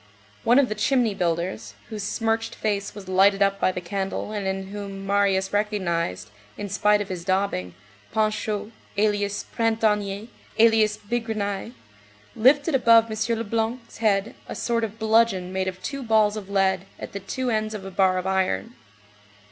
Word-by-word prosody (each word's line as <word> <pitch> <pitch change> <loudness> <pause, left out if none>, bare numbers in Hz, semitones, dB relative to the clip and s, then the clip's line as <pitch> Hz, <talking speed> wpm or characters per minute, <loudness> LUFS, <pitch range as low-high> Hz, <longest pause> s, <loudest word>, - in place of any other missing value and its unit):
One 240 +2 +5
of 280 -2 +5
the 215 - -2
"chimney 225 +1 +2
builders," 175 0 -2
whose 215 -2 -5
smirched 225 +2 -1
face 200 -2 -2
was 200 -3 -9
lighted 195 +2 +4
up 195 0 +1
by - - +2
the 180 - -5
candle, 195 +3 -3
and 205 -2 -3
in 190 0 -3
whom 195 -1 -6
Marius 195 -1 +1
recognized, 170 - -1 0.3
in 205 - -5
spite 210 +1 +3
of 205 - -5
his 180 -2 -5
daubing, 185 - -1 0.4
Panchaud, 215 0 -1 0.3
alias 205 -1 0
Printanier, 215 -2 +1 0.3
alias 220 -2 +4
Bigrenaille, 215 -1 -3 0.6
lifted 285 +7 +4
above 230 -3 +5
M. 220 +2 -1
Leblanc's 230 +2 -3
head 210 -1 +1
a - - -6
sort 230 -1 0
of 220 0 -4
bludgeon 220 -5 +2
made 190 0 -1
of 185 0 -4
two 275 -1 -4
balls 220 -3 +3
of 205 -2 -7
lead, 195 -1 +1
at - - -8
the 200 - -5
two 245 +6 -3
ends 215 0 -1
of 195 -2 -7
a 195 - -6
bar 185 0 +3
of 185 - -3
iron. 190 - 0
205 Hz, 165 wpm, -24 LUFS, 190-225 Hz, 0.6 s, One